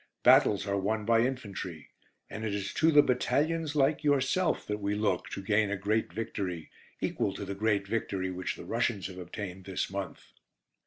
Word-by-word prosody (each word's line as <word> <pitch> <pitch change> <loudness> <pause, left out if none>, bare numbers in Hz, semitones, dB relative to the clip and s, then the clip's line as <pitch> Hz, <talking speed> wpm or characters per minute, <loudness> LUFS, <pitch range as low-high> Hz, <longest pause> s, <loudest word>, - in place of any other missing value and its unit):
Battles 100 -1 +5
are 100 -1 0
won 105 +2 -1
by 115 0 +4
infantry, 100 - -4 0.4
and 110 - -7
it 105 -2 -1
is 100 -1 -3
to 160 - +3
the 145 -1 +7
battalions 150 +5 0
like 145 +2 +2
yourself 145 +4 +2
that 105 0 -3
we 100 0 -1
look 105 -4 0
to 100 - -6
gain 105 +1 +2
a 100 - -1
great 105 0 0
victory, 95 -4 -4 0.3
equal - - -1
to - - -5
the 100 - -4
great 100 0 +1
victory 95 -4 -2
which 90 0 -3
the - - -10
Russians 115 -4 0
have 95 -1 -6
obtained 90 +1 -7
this 95 -1 -2
month. 100 -1 -6
105 Hz, 180 wpm, -30 LUFS, 95-120 Hz, 0.4 s, the